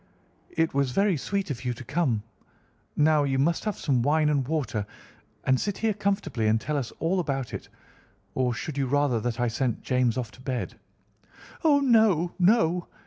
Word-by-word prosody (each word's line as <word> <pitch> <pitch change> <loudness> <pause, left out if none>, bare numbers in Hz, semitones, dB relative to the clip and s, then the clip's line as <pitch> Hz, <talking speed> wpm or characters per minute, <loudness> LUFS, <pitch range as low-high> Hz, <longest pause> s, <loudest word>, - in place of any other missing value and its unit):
"It 160 0 0
was 140 -1 +1
very 195 +3 +3
sweet 195 +4 -2
of 125 -2 -5
you 125 -1 -2
to 120 - -9
come. 130 -6 0 0.7
Now, 155 0 +4
you 135 -1 0
must 165 +8 +1
have 210 -3 -2
some 130 -5 +1
wine 150 +4 +2
and 140 -4 +1
water, 120 -10 -2 0.6
and 130 -1 +2
sit 205 -2 -2
here 225 -1 +1
comfortably 195 - -1
and 110 +1 +3
tell 150 +6 -3
us 135 -5 -2
all 180 +3 0
about 135 -7 -2
it. - - -6 0.6
Or 130 -1 +1
should 145 +2 -4
you 135 - 0
rather 140 -3 +2
that 115 +1 -3
I 120 - +2
sent 120 +1 -2
James 125 -3 +1
off 120 -4 -3
to 125 - -16
bed?" 130 -2 -4 0.8
"Oh, 290 -3 +5
no, 220 - +3
no! 180 -3 +3
145 Hz, 185 wpm, -26 LUFS, 125-175 Hz, 0.8 s, Oh